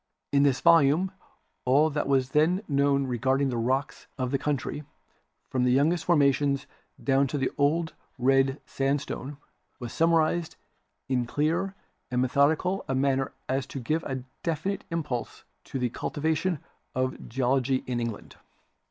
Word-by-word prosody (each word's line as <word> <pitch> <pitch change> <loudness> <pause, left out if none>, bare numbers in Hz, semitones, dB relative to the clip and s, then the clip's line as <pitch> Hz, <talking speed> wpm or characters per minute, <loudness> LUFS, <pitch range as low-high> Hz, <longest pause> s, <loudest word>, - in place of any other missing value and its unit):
In 140 - +4
this 140 -2 +3
volume 170 +2 +5 0.5
all 145 +5 +4
that 145 -1 -1
was 135 -2 +2
then 175 +7 +3
known 140 -1 +2
regarding 130 +2 +1
the 125 - -2
rocks 130 +5 -1
of 130 -2 -2
the 140 - +1
country, 150 +1 -2 0.7
from 130 -1 +1
the 125 - +3
youngest 155 +5 +2
formations 140 -3 +3 0.4
down 135 0 +3
to 145 - -3
the 130 -1 0
Old 160 +3 +1 0.2
Red 135 +2 +3
Sandstone, 140 0 -2 0.4
was 120 -3 -7
summarized 165 0 +2 0.5
in 125 -2 0
so - - -15
clear 165 +6 0 0.3
and 125 -1 0
me 130 - +2
thodical 160 +8 +2
a 135 - -1
manner 135 0 +1 0.2
as 130 0 -1
to 135 - -6
give 155 +7 -1
a 130 -2 -4 0.2
definite 170 +4 -2
impulse 150 -8 -4 0.2
to - - -5
the 125 -1 0
cultivation 160 +5 -1 0.4
of 130 0 -2
Geology 130 +1 +1
in 125 -1 -2
England. 115 -3 -5
140 Hz, 150 wpm, -27 LUFS, 130-155 Hz, 0.7 s, volume